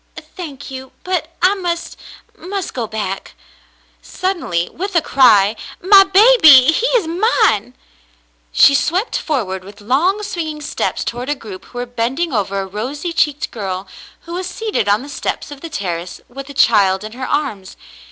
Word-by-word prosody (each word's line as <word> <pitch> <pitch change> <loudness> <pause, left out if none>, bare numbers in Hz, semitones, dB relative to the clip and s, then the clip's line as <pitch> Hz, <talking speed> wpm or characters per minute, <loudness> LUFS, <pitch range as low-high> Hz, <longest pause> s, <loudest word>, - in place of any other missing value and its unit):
"Thank 295 -7 -9
you 265 0 -9
— - - -40
but 360 -3 -2
I 370 +2 +5
must 350 -4 -4 0.2
— 465 - -33
must 390 -1 -5
go 235 -3 -3
back." 205 -3 -5 0.7
Sud 380 0 -3
denly, 175 - -2
with 390 +2 -5
a - - +6
cry, 225 -8 +4 0.2
"My 390 +2 +7
baby, 380 - +7
he 455 +9 +1
is 420 - -1
mine," 350 - +1 0.8
she 280 - +6
swept 360 - 0
forward 195 - -2
with 200 +2 -13
long, 315 - +1
swinging 320 -7 -4
steps 295 - -2
toward 245 +3 -4
a 295 - 0
group 210 -8 -10
who - - -13
were 245 - -2
bending 245 +7 -2
over 200 -2 -1
a - - -4
rosy 260 - -5
cheeked 295 -3 0
girl, 190 -3 -4 0.4
who 340 - -10
was 365 +1 -3
seated 430 - -2
on 210 +4 +2
the - - -10
steps 290 - -4
of 285 -1 -10
the 330 - -7
terrace 180 - -4
with 275 +3 -9
a 280 - -10
child 195 -5 +3
in 215 - -7
her 255 +3 -6
arms. 210 -11 -3
275 Hz, 175 wpm, -17 LUFS, 215-350 Hz, 0.8 s, My